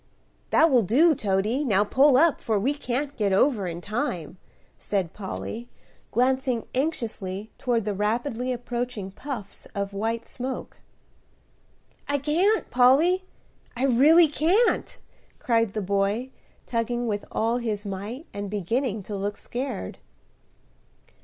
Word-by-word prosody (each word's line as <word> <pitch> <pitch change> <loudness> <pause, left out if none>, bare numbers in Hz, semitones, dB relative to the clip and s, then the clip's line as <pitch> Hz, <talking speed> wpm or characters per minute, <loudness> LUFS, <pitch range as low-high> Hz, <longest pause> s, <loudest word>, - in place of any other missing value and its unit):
"That 320 -1 +5
will 250 -3 +5
do, 285 - +4
Toady; 215 +3 0
now 205 -7 +3
pull 265 +5 +4
up, 325 +2 +4
for 220 -2 0
we 260 +8 +1
can't 285 0 -3
get 205 -3 0
over 200 0 +3
in 170 0 -5
time," 190 - -3 0.4
said 190 -5 -2
Polly, 220 +4 -6 0.4
glancing 255 -1 +1
anxiously 220 - -3
toward 235 -4 0
the 210 - -1
rapidly 235 +5 -1
approaching 240 -4 -4
puffs 225 -2 -7
of 200 0 -3
white 225 +3 -2
smoke. 260 +1 -6 1.3
"I 285 - +2
can't, 340 +10 +1
Polly, 305 +10 +4 0.5
I 260 - +1
really 300 +7 +6
can't," 350 +10 +1 0.4
cried 230 -4 +1
the 215 - -2
boy, 200 +6 0 0.3
tugging 240 0 -1
with 205 -3 -2
all 230 +2 +1
his 220 -4 -3
might, 205 - -5
and 205 0 -4
beginning 210 +3 -1
to 205 - -6
look 205 +1 -3
scared. 245 - -5
235 Hz, 125 wpm, -25 LUFS, 205-265 Hz, 1.3 s, really